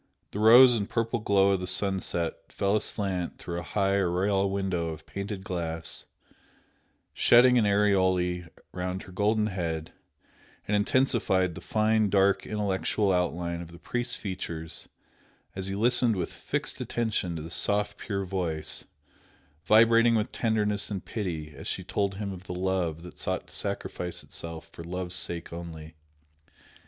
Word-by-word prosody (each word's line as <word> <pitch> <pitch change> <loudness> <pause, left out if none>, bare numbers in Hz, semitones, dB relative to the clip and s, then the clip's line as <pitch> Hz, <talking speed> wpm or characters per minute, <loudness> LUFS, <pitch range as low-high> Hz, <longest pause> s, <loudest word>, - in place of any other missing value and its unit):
The 105 - -5
rose 120 +3 +8
and 100 -3 -2
purple 115 +1 0
glow 100 -2 +3
of 95 - +1
the 90 - -4
sunset 95 -4 -1
fell 100 +1 +1
aslant 95 -4 0
through 85 -1 -5
a - - -10
high 100 0 +3
oriel 95 +2 +1
window 95 -4 -1
of 80 -1 -7
painted 100 0 -5
glass, 85 -3 -3 1.1
shedding 125 +1 +6
an 105 - +3
aureole 95 -3 +2 0.3
round 90 +1 -4
her 95 - -12
golden 105 +3 +1
head, 85 -6 -3 0.7
and 105 - +1
intensified 105 -5 +2
the - - -9
fine, 110 -1 +2
dark 100 0 +3
intellectual 105 -1 0
outline 85 -1 -1
of 85 -1 -9
the 85 - -12
priest's 120 +6 -3
features 85 -5 -6 0.7
as 95 0 -2
he 95 - -2
listened 120 +1 +4
with 90 -3 -3
fixed - - -3
attention 110 -7 -1
to 80 - -5
the 80 - -8
soft 105 0 0
pure 100 -2 -3
voice, 90 -5 -3 0.8
vibrating 115 +2 +6
with 110 -1 0
tenderness 105 -2 +1
and 100 -3 -4
pity 80 -8 -4
as - - -8
she - - -2
told 100 -1 -1
him 100 0 -4
of 95 -1 -9
the 90 - -5
love 90 -3 -1
that 90 - -12
sought - - -2
to - - -12
sacrifice 90 -1 -3
itself 85 -1 -7
for 85 - -11
love's 90 +1 -4
sake 85 -2 -4
only. 80 -2 -8
95 Hz, 150 wpm, -28 LUFS, 90-105 Hz, 1.1 s, rose